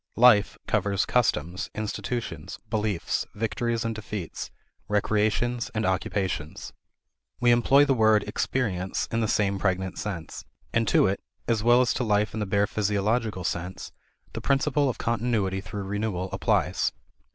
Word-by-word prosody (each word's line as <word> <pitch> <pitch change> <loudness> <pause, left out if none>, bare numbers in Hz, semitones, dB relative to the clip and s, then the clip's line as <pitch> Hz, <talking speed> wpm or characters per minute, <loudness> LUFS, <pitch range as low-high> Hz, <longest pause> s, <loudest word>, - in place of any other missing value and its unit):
"Life" 115 -4 +6
covers 100 -3 +1
customs, 90 -7 0
institutions, 110 - -4
beliefs, 105 -5 -1
victories 115 +2 -1
and 115 - -1
defeats, 105 -5 -6 0.4
recreations 110 +3 +1
and 110 +1 0
occupations. 95 -4 -2 0.7
We 120 0 +4
employ 135 +4 +5
the 140 - +3
word 110 -3 +4
"experience" 100 -4 -1
in 115 - 0
the 110 - +1
same 100 -2 +1
pregnant 95 -1 -1
sense. 90 -7 -5 0.3
And 115 -1 +2
to - - +4
it, 95 +1 0 0.3
as 115 -2 +1
well 120 +2 +5
as 125 - +2
to 125 - -1
life 105 -2 +1
in 110 - -3
the 105 - -2
bare 100 +1 +2
physiological 105 0 0
sense, 90 +2 -4 0.4
the - - -5
principle 140 0 +2
of 125 - -3
continuity 110 -5 0
through 100 +1 -6
renewal 95 -2 -2
applies. 95 -3 +1
105 Hz, 140 wpm, -26 LUFS, 95-115 Hz, 0.7 s, Life